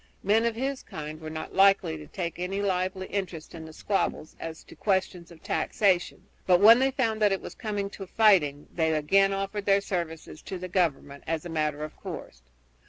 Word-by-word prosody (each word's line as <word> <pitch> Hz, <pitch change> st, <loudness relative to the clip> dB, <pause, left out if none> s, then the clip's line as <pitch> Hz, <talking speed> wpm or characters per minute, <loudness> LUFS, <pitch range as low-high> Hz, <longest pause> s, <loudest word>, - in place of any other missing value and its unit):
Men 215 Hz, +4 st, +3 dB
of 230 Hz, -1 st, 0 dB
this 265 Hz, +3 st, -2 dB
kind 155 Hz, +1 st, -8 dB
were 155 Hz, -, -6 dB
not 155 Hz, 0 st, -6 dB
likely 195 Hz, -4 st, +4 dB
to 150 Hz, -1 st, -10 dB
take 170 Hz, 0 st, -5 dB
any 185 Hz, +2 st, -2 dB
lively 190 Hz, -1 st, -1 dB
interest 185 Hz, -6 st, -5 dB
in 165 Hz, -2 st, -8 dB
the 160 Hz, -, -10 dB
squabbles 160 Hz, -2 st, -2 dB
as 165 Hz, 0 st, -7 dB
to -, -, -15 dB
questions 185 Hz, -3 st, -1 dB
of 165 Hz, -2 st, -16 dB
taxation, 185 Hz, -4 st, 0 dB, 0.2 s
but 180 Hz, -1 st, +5 dB
when 225 Hz, +4 st, +8 dB
they 265 Hz, +1 st, +3 dB
found 230 Hz, -5 st, -1 dB
that 205 Hz, -1 st, +4 dB
it 195 Hz, -, 0 dB
was -, -, -9 dB
coming 205 Hz, -3 st, -3 dB
to 195 Hz, -2 st, -8 dB
fighting 175 Hz, -10 st, +3 dB
they 160 Hz, -2 st, +1 dB
again 195 Hz, +6 st, +3 dB
offered 195 Hz, +1 st, -3 dB
their 200 Hz, 0 st, +5 dB
services 170 Hz, -5 st, -5 dB
to 190 Hz, -, -6 dB
the 185 Hz, +1 st, -6 dB
government 150 Hz, -6 st, -1 dB
as 165 Hz, 0 st, -2 dB
a -, -, -5 dB
matter 150 Hz, -2 st, -1 dB
of 155 Hz, -, -7 dB
course. -, -, -8 dB
185 Hz, 200 wpm, -27 LUFS, 160-200 Hz, 0.2 s, when